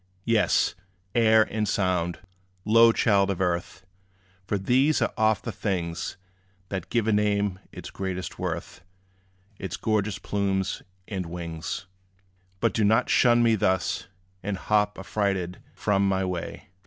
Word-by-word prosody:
Yes 115 -2 +3 0.4
air 110 -2 +5
and 110 0 -2
sound, 90 -3 0 0.5
low 115 +2 +7
child 100 -4 +3
of 95 - -2
earth! 90 +1 -2 0.6
For 100 - 0
these 130 +9 +3
are - - 0
oft 110 -2 +2
the 115 - -3
things 90 -4 -3 0.5
That 95 -4 -4
give 115 -3 +1
a 110 - +3
name 100 -2 +1
its - - -9
greatest 95 -3 -5
worth, - - -4 0.8
Its 95 -3 -4
gorgeous 105 -2 0
plumes 95 -2 -1 0.3
and 95 -5 -4
wings. 85 +1 -5 0.8
But 115 - +2
do 110 - +1
not 110 +4 +3
shun 120 -1 +5
me 115 -1 +4
thus, 95 -4 0 0.3
and 100 0 -3
hop 105 +1 +1
Affrighted 95 -2 -2 0.2
from 100 -1 +1
my 95 0 +1
way. 90 -1 -5
100 Hz, 135 wpm, -26 LUFS, 95-110 Hz, 0.8 s, low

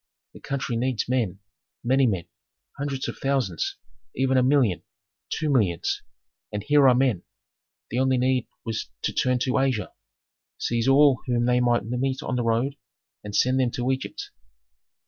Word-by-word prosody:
The - - -12
country 135 -3 -3
needs 125 -1 -1
men, 110 -7 -1 0.4
many 130 +2 +3
men, 95 -6 -1 0.5
hundreds 140 -1 -3
of - - -6
thousands, 140 - -1 0.4
even 130 0 +1
a 130 - +5
million, 125 -8 +3 0.5
two 155 - -2
millions. 100 - +1 0.5
And 105 -1 -4
here 145 +2 +5
are 125 - +5
men! 125 -8 +2 0.7
The 120 - 0
only 130 0 +3
need 125 -1 +1 0.2
was 115 -2 -3
to - - -1
turn 125 0 +2
to 130 - +1
Asia, 130 -7 0 0.6
seize 115 0 -1
all 135 -1 +5
whom 120 -1 +1
they 125 0 +3
might 120 -4 +2
meet 130 +3 -2
on 130 - -2
the 125 - 0
road, 115 +5 0 0.5
and 105 -1 -6
send 130 +1 +3
them 130 -2 +2
to 125 +1 0
Egypt. 130 0 -4
125 Hz, 160 wpm, -25 LUFS, 120-135 Hz, 0.7 s, a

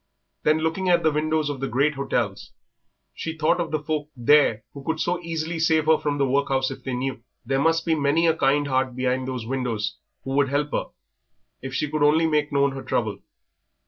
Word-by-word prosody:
Then 155 +1 +3
looking 165 +4 -1
at 175 - +4
the 160 - +4
windows 155 0 0
of 145 -2 -3
the 135 - -2
great 140 +5 +1
hotels, 120 -8 -2 0.6
she 160 0 -5
thought 155 +3 +2
of 165 - -3
the 155 - 0
folk 150 -1 -2
there 120 -3 +4
who 140 - -9
could 160 +2 -2
so 175 +1 0
easily 165 0 -3
save 160 -1 +2
her 160 0 +4
from 145 -1 -1
the 140 - +2
workhouse 135 0 +1
if - - -9
they 130 -2 -3
knew. 130 -1 -3 0.2
There 135 0 0
must 165 +1 +2
be 165 - +2
many 150 +2 +2
a 165 -1 +3
kind 145 0 +2
heart 130 -2 0
behind 130 0 -1
those 130 -3 -4
windows 115 -5 -2 0.3
who 135 - -5
would 140 0 +2
help 145 +1 -1
her - - -1 0.8
if 130 0 -6
she 150 - 0
could 155 +1 -3
only 155 +3 +4
make 150 -1 +1
known 140 -1 +2
her 135 0 -6
trouble. - - -2
145 Hz, 210 wpm, -24 LUFS, 135-160 Hz, 0.8 s, at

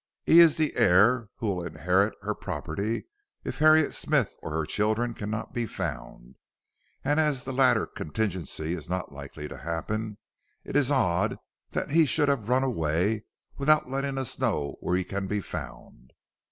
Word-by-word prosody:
He 165 - +7
is 165 -3 +7
the 155 -2 0
heir 105 +5 +4
who - - -6
will 90 -2 -4
inherit 90 +5 +1
her 105 +1 -1
property 95 +5 -4 0.4
if - - -5
Harriet 155 0 +5
Smith - - 0
or - - -6
her 80 0 -1
children 110 +7 0
cannot 105 +1 -5
be 120 -1 -1
found, 60 - -6 0.7
and 145 +3 +2
as 150 -5 +1
the 135 - -4
latter 130 -1 +4
contingency 85 -3 -3
is 85 -2 -6
not 90 0 -3
likely 70 +2 -8
to - - -9
happen, 105 +7 -4 0.5
it - - -8
is 145 -2 +3
odd 90 -12 +1 0.3
that - - -3
he 160 0 +5
should 150 -1 +2
have 120 -6 -1
run 130 +1 +3
away 100 - 0 0.3
without 150 -2 +3
letting 135 0 -2
us 130 -2 -4
know 95 - -1
where 90 - -1
he 90 - +1
can 100 +1 -4
be 105 +1 -1
found." 65 -8 -9
105 Hz, 165 wpm, -27 LUFS, 90-135 Hz, 0.7 s, He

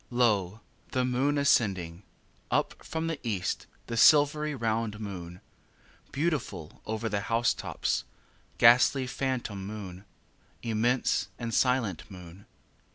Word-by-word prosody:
2. 120 - -10
Lo! 105 -4 +2 0.3
the 130 -1 +1
moon 130 +4 +1
ascending! 95 -11 +1 0.5
Up - - -1
from 160 0 -3
the 165 -3 -3
east, 100 -6 -2 0.2
the 115 - -5
silvery 150 +3 +5
round 115 -3 -1
moon; 90 -4 -7 0.7
Beautiful 140 - -3
over 110 +1 -2
the 100 -2 -1
house 115 +3 +1
tops, - - -2 0.5
ghastly, 125 +3 +6
phantom 125 -6 -3
moon; 100 -3 -8 0.6
Immense 115 -1 +1
and 115 -1 -4
silent 125 - +1
moon. 90 0 -12
115 Hz, 115 wpm, -29 LUFS, 100-130 Hz, 0.7 s, ghastly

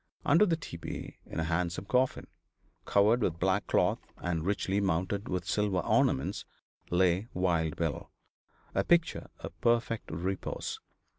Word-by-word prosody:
Under 210 - +5
the 170 - +2
tepee, 85 - -7
in - - -5
a - - +1
handsome 85 +3 -1
coffin, 125 +4 +1 0.6
covered 105 +5 +4
with 85 -6 0
black 95 +3 +1
cloth - - +2 0.2
and 85 -3 -2
richly 100 +1 0
mounted 95 +2 -1
with 90 -1 -2
silver 105 0 +1
ornaments, 65 - +1 0.5
lay 90 +3 +2
Wild 85 -4 +1
Bill, 80 -4 -2 0.6
a - - +2
picture 170 -1 +2
of 85 -1 -9
perfect 115 -1 +1
repose. 90 +4 -3
95 Hz, 135 wpm, -30 LUFS, 85-105 Hz, 0.6 s, Under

